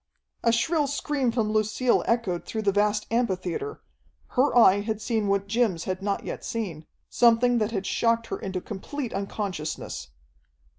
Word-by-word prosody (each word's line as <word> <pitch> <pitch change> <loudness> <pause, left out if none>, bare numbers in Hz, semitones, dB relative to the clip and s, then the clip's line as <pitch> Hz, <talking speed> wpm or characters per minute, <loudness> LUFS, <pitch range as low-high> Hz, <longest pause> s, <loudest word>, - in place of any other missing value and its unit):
A 230 - +4
shrill 290 +6 +2
scream 285 -2 0
from 225 -3 0
Lucille 215 +3 +2
echoed 225 -7 0
through 220 -1 -4
the 200 - +3
vast 210 +1 +1
amphitheatre. 230 - -1 0.5
Her 260 0 +2
eye 205 -4 +7
had 215 +1 -2
seen 220 -1 -1
what 200 0 +1
Jim's 210 -6 +1
had 185 0 -3
not 200 0 -1
yet - - -5
seen 175 -9 -4 0.2
something 240 +1 +4
that 215 -1 +1
had 200 -4 -3
shocked 230 0 +1
her - - -3
into 190 -1 -4
complete 235 +7 -5
unconsciousness. 185 - -4
215 Hz, 155 wpm, -26 LUFS, 195-235 Hz, 0.5 s, eye